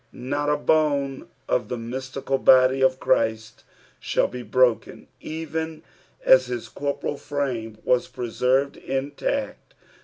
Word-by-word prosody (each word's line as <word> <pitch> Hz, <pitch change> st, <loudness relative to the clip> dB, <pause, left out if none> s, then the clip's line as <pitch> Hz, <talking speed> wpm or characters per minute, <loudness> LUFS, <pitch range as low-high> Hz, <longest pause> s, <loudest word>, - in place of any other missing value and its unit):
Not 145 Hz, +4 st, -2 dB
a 150 Hz, -, +2 dB
bone 145 Hz, -3 st, +1 dB, 0.2 s
of 125 Hz, -, 0 dB
the 125 Hz, -, -3 dB
mystical 130 Hz, +3 st, -3 dB
body 130 Hz, +1 st, +5 dB
of 130 Hz, 0 st, +3 dB
Christ 110 Hz, -4 st, 0 dB, 0.4 s
shall -, -, +1 dB
be 125 Hz, -, -7 dB
broken, 125 Hz, -1 st, +1 dB
even 160 Hz, 0 st, -5 dB, 0.4 s
as -, -, +6 dB
his 375 Hz, -, -5 dB
corporeal 145 Hz, 0 st, -3 dB
frame 135 Hz, -7 st, -3 dB
was 125 Hz, -1 st, +2 dB
preserved 130 Hz, +3 st, 0 dB
intact. 145 Hz, -, -3 dB
135 Hz, 120 wpm, -24 LUFS, 125-145 Hz, 0.4 s, as